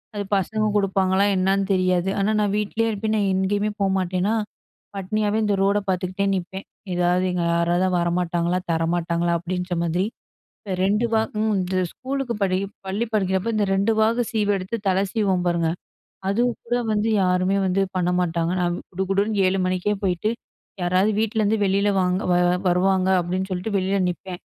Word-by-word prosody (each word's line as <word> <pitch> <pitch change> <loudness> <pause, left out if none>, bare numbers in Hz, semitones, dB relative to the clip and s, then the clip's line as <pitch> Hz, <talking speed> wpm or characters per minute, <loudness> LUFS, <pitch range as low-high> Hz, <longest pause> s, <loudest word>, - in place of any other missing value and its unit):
அது 205 - -2
பசங்க 215 +3 0
குடுப்பாங்களா, 195 -1 +2
என்னான்னு 195 +1 +1
தெரியாது. 185 0 +1
ஆனா 200 +2 +1
நான் 205 -1 0
வீட்லயே 220 +2 0
இருப்பேன். 220 +1 -1
நான் 200 -2 +1
எங்கயுமே 205 +2 0
போமாட்டேனா, 190 +1 +1 0.6
பட்னியாவே 210 +2 -1
இந்த 205 -1 +1
ரோட 200 +1 +3
பாத்துக்கிட்டே 185 +1 -1
நிப்பேன். 190 +1 -5 0.3
"எதாவது, 180 +1 +2
எங்க 180 -1 -1
யாராவது 175 +2 +2
வரமாட்டாங்களா? 175 0 0
தரமாட்டாங்களா?" 170 +1 0
அப்படின்ற 180 +1 -3
மாதிரி. 175 +3 0 0.5
இப்போ 195 - -5
2 210 +4 +2
வா 220 - +4 0.2
ம் 220 0 +1
இந்த 185 0 -2 0.2
ஸ்கூலுக்கு 265 -1 -3
படி 185 -2 +2 0.3
பள்ளி 200 +5 -1
படிக்கிறப்போ, 190 0 0
இந்த 210 -1 +2
2 200 +4 +2
வாகு 230 +3 +3
சீவு 210 -2 +1
எடுத்து, 185 +4 -4
தலை 190 0 +2
சீவுவோம் 195 -5 0
பாருங்க. 170 -2 +1 0.6
அதுவும் 235 +4 +1
கூட 240 +1 0 0.2
வந்து, 210 +1 +1
யாருமே 185 +1 +2
வந்து 185 +1 +1 0.2
பண்ண 180 -1 +1
மாட்டாங்க. 170 -1 0
நான் 175 -1 0 0.2
குடுகுடுன்னு 195 +3 0
7:00 190 +1 +1
மணிக்கே 185 +3 0
போயிட்டு, 185 +3 0 0.5
யாராவது 185 +4 +2
வீட்லருந்து 220 -1 +1
வெளில 200 +1 +2
வாங்க 180 0 +1
வ - - +4 0.3
வருவாங்க, 185 +1 +2
அப்டின்னு 185 +2 -3
சொல்லிட்டு, 185 +3 -3
வெளியில 190 +1 0
நிப்பேன். 180 0 -6
190 Hz, 155 wpm, -23 LUFS, 180-205 Hz, 0.6 s, வா